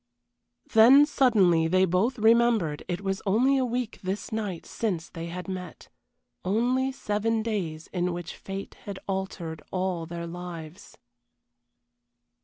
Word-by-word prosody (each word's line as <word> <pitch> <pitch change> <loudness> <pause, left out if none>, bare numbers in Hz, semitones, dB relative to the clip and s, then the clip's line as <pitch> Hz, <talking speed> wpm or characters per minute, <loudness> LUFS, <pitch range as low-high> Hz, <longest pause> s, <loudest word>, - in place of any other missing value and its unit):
Then 255 +6 +8
suddenly 205 - +3
they 185 +3 +4
both 190 +9 +1
remembered 225 -8 +3
it 180 +1 -3
was 195 -1 -2
only 250 +7 +3
a - - +2
week 245 -1 -3
this 190 +2 -4
night 205 -6 -3
since 185 -8 -2
they 165 -1 -7
had 180 +2 -6
met. 185 -3 -7 0.5
Only 245 +7 +1
seven 220 -2 -1
days 175 -8 -3
in 180 -1 0
which 175 -1 -6
fate 195 0 -7
had 200 -2 -5
altered 190 -5 -4
all 180 -3 -2
their 170 0 -5
lives. 175 +1 -8
195 Hz, 130 wpm, -27 LUFS, 175-225 Hz, 0.5 s, Then